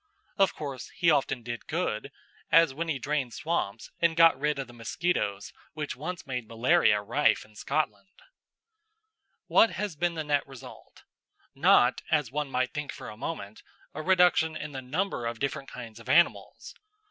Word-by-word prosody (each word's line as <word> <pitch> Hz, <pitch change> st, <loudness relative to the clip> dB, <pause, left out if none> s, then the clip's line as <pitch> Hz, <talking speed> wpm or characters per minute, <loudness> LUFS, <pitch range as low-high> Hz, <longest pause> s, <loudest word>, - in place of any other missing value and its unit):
Of 195 Hz, -, +3 dB
course, 135 Hz, -5 st, -6 dB
he 170 Hz, -3 st, +4 dB
often 135 Hz, -4 st, 0 dB
did 120 Hz, 0 st, -6 dB
good, 145 Hz, -7 st, -2 dB, 0.4 s
as 165 Hz, -4 st, +6 dB
when 165 Hz, +4 st, -3 dB
he 155 Hz, -4 st, -1 dB
drained 135 Hz, -4 st, -2 dB
swamps 115 Hz, -10 st, -3 dB
and 170 Hz, -1 st, +2 dB
got 165 Hz, 0 st, +7 dB
rid 150 Hz, 0 st, 0 dB
of 135 Hz, -, -3 dB
the 120 Hz, -, -15 dB
mosquitoes 115 Hz, -, -2 dB, 0.2 s
which 150 Hz, -2 st, -4 dB
once 160 Hz, +7 st, -6 dB
made 125 Hz, -4 st, -4 dB
malaria 115 Hz, 0 st, +3 dB
rife -, -, +2 dB
in 110 Hz, -, -21 dB
Scotland. 155 Hz, -, -3 dB, 1.3 s
What 225 Hz, -, +5 dB
has 205 Hz, -5 st, -3 dB
been 175 Hz, +2 st, 0 dB
the 160 Hz, -, -3 dB
net 145 Hz, -2 st, 0 dB
result? 135 Hz, -3 st, -13 dB, 0.5 s
Not, -, -, +4 dB
as 150 Hz, -6 st, +1 dB
one 150 Hz, 0 st, -2 dB
might 130 Hz, -1 st, -1 dB
think 150 Hz, -1 st, -4 dB
for -, -, -9 dB
a 105 Hz, -, -9 dB
moment, 110 Hz, -5 st, -6 dB, 0.3 s
a 155 Hz, -, -5 dB
reduction 175 Hz, -3 st, +3 dB
in 150 Hz, -, -6 dB
the 135 Hz, -1 st, -6 dB
number 135 Hz, -1 st, -2 dB
of 115 Hz, 0 st, -4 dB
different 140 Hz, +2 st, -3 dB
kinds 115 Hz, -2 st, -9 dB
of 115 Hz, +2 st, -12 dB
animals. 170 Hz, +5 st, +2 dB
145 Hz, 170 wpm, -28 LUFS, 120-165 Hz, 1.3 s, got